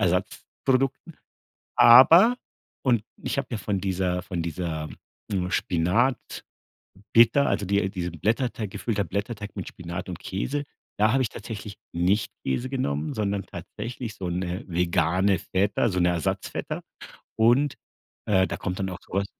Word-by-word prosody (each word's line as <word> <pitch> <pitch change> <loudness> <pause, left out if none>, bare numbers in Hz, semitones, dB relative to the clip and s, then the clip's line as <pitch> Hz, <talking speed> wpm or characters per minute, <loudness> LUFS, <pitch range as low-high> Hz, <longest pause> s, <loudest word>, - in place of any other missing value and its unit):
Ersatzprodukten. 130 - -1 0.6
Aber 165 - +8 0.5
und 120 -5 +3 0.2
ich - - -2
habe 135 - -2
ja 115 - -2
von 100 -1 -2
dieser 95 -2 -1
von 90 -2 -3
dieser, 80 -2 -4 0.4
hm, 90 -2 -1
Spinat-Pita, 95 +9 -1 0.8
also 100 - 0
die 100 +2 +2
äh, 95 - -1
diesen 90 -4 -5
Blätterteig 115 - -1
gefüllter 105 0 -2
Blätterteig 100 +4 -4
mit 95 - -5
Spinat 85 0 -7
und 90 - -5
Käse, 130 +11 -3 0.3
da 110 +1 +4
habe 130 0 +3
ich 115 - 0
tatsächlich 105 -2 -7 0.2
nicht 90 +5 +1
Käse 120 - -2
genommen, 75 - -1
sondern 100 -2 -1
tatsächlich 120 -2 -7
so 90 -2 -4
'ne 90 +1 -3
vegane 90 +2 +2
Feta, 100 +4 +1
so 90 - -1
'ne 90 - +4
Ersatz-Feta 85 -3 -2 0.6
und, 120 +6 +4 0.5
äh, 95 -3 +3
da - - -4
kommt 90 0 -4
dann 95 -1 -2
auch 90 - -7
so - - -12
was 100 +1 +1
100 Hz, 145 wpm, -26 LUFS, 90-115 Hz, 0.8 s, Aber